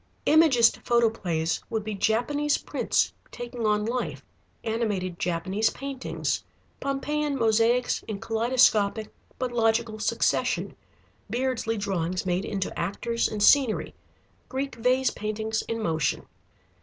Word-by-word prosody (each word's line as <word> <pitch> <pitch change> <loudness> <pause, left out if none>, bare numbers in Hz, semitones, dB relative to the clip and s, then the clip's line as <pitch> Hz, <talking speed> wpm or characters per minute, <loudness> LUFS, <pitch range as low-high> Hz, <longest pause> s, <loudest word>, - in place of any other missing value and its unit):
Imagist 285 -8 +5
photoplays 190 -9 +1
would 220 -2 -2
be 215 0 -4
Japanese 245 +9 +1
prints - - 0 0.2
taking 240 -2 -4
on 210 0 +2
life, 245 +2 -3 0.4
animated 205 -6 -2
Japanese 185 +5 0
paintings, 275 -1 -3 0.4
Pompeian 285 +1 -1
mosaics 230 +1 +2
in 215 - -3
kaleidoscopic 220 -2 +2 0.2
but 255 -1 -2
logical 225 -1 +1
succession, 215 - 0 0.5
Beardsley 240 -1 -1
drawings 185 -3 -2
made 180 +1 0
into 195 -3 -3
actors 230 +6 -1
and 210 -1 -2
scenery, 265 -5 +4 0.6
Greek 270 +1 -3
vase 250 +2 +2
paintings 220 +1 -2
in 230 0 -2
motion. 160 -8 0
225 Hz, 110 wpm, -26 LUFS, 205-250 Hz, 0.6 s, Imagist